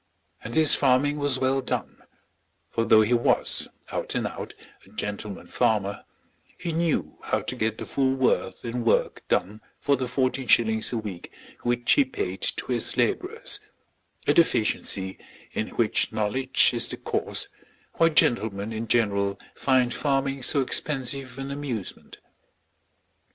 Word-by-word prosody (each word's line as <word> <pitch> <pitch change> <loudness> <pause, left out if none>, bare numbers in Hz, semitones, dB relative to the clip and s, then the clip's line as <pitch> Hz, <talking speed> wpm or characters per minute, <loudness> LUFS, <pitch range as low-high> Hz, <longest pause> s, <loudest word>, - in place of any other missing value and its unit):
And 115 - -6
his 155 -2 +7
farming 145 +3 +3
was 145 -2 +1
well 130 +1 +1
done; 130 - -4 0.7
for 115 - 0
though 110 -1 +6
he 110 +3 +1
was, 120 0 +1 0.2
out - - -3
and - - 0
out, - - -6 0.3
a - - -19
gentleman 105 -1 -5
farmer, 100 -2 0 0.5
he 175 - -3
knew 165 0 -1
how - - -1
to - - -3
get 110 0 -1
the - - -6
full 135 -1 +1
worth 130 -2 0
in 120 +1 -3
work 115 - +1
done 105 +4 0 0.2
for 140 - +2
the 130 -1 -3
fourteen 130 0 -1
shillings 110 -2 +3
a 120 - -1
week 100 -6 -6 0.3
which 120 0 +1
he 285 - +6
paid 405 - -4
to - - -2
his - - +2
labourers, 435 +6 +1 0.7
a - - +4
deficiency 100 - +1 0.3
in - - -2
which - - +1
knowledge 130 +5 +2
is 120 -1 0
the - - -5
cause - - -2 0.4
why 165 - +4
gentlemen 110 -8 +1
in 110 +1 -4
general 100 -4 +1
find 130 -2 +2
farming 135 -1 0
so 140 +3 +3
expensive 135 -1 -1
an 135 0 -5
amusement. 135 -8 -5
125 Hz, 145 wpm, -26 LUFS, 110-140 Hz, 0.7 s, his